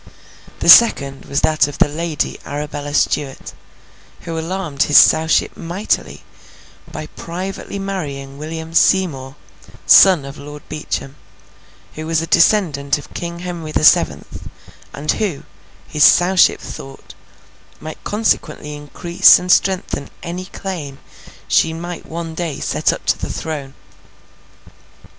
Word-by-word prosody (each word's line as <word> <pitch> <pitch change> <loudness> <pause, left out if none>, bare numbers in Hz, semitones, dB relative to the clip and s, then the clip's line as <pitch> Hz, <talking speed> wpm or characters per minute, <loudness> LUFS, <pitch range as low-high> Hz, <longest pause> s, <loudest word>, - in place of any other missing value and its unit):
The - - -2
second 140 -12 +6
was 140 - -1
that 155 -2 +2
of 145 - -8
the - - +3
Lady 155 +1 -3
Arabella 145 0 -5
Stuart, 140 -2 -1 0.7
who 165 - -6
alarmed 165 -4 -4
his 145 - +5
Sowship 160 +1 +4
mightily, 175 +5 -3 0.7
by - - -6
privately 185 +3 -7
marrying 145 -9 -6
William 160 +1 -7
Seymour, 150 -8 +1 0.5
son 185 -7 +6
of 140 +1 -10
Lord 145 0 -10
Beauchamp, 140 -2 -5 0.8
who 155 0 -7
was 165 -1 +1
a 165 - -3
descendant 165 -6 +2
of 145 - -13
King 170 0 -6
Henry 170 -3 -6
the 155 - -1
Seventh, - - +2 0.4
and 150 +2 -2
who, 195 -10 -3 0.4
his 150 -2 +1
Sowship 180 +1 +5
thought, 135 0 -10 0.7
might 155 0 -9
consequently 205 -8 -2
increase 150 +4 +4
and 180 0 -2
strengthen 185 -7 0
any 180 +2 -5
claim 170 -8 -7 0.5
she 110 - +2
might 175 +1 -7
one 165 0 -6
day 160 -3 -4
set - - 0
up - - -7
to - - +1
the - - -5
throne. 145 -4 -6
160 Hz, 125 wpm, -18 LUFS, 145-175 Hz, 0.8 s, second